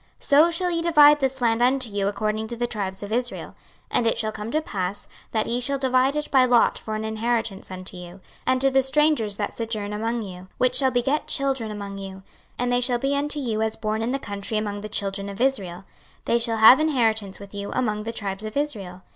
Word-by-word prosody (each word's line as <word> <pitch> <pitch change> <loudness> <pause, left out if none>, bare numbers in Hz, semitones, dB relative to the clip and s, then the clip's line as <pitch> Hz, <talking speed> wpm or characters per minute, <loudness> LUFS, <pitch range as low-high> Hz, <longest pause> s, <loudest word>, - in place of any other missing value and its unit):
26:047:021 - - -16
So 300 +4 +6
shall 355 +1 +1
ye 335 -1 -1
divide 300 -3 +6
this 265 -1 -1
land 230 -1 +2
unto 260 +1 +2
you 200 -2 -2
according 215 +2 -2
to 235 - -5
the 240 +1 -1
tribes 200 -4 -3
of 205 - -7
Israel. 245 +2 -2
26:047:022 - - -21 0.4
And 235 - +2
it 225 - +1
shall 220 -1 -1
come 215 0 -6
to 305 - +1
pass, 190 -5 -4 0.2
that 220 -1 0
ye 240 +1 -1
shall 275 +3 -1
divide 260 +1 +2
it 300 0 -3
by 265 -2 +5
lot 245 -2 +3
for 215 - -5
an 215 0 -3
inheritance 220 -2 -2
unto 185 0 -7
you, 180 +1 -10 0.3
and 255 0 +3
to 270 0 +4
the 270 0 +4
strangers 265 -6 +2
that 205 - -3
sojourn 215 -3 -4
among 225 +2 -2
you, 185 -2 -9
which 255 - +2
shall 265 -2 +5
beget 265 +4 0
children 270 -5 0
among 200 -1 -6
you: 190 -1 -8 0.3
and 245 0 -1
they 245 0 +2
shall 245 -1 +1
be 275 +3 -1
unto 290 +1 0
you 225 -5 -2
as 220 0 0
born 215 0 -2
in 225 - -1
the 270 - 0
country 205 -3 -4
among 205 -1 -3
the 215 - -7
children 200 -1 -3
of 200 - -8
Israel; 200 -10 -1 0.4
they 235 - +2
shall 230 -1 0
have 220 +5 +8
inheritance 225 -10 +1
with 200 0 -12
you 200 0 -5
among 215 -4 -1
the 225 +2 -4
tribes 200 -2 -4
of 215 +4 -5
Israel. 195 -11 -3
225 Hz, 235 wpm, -24 LUFS, 205-260 Hz, 0.4 s, have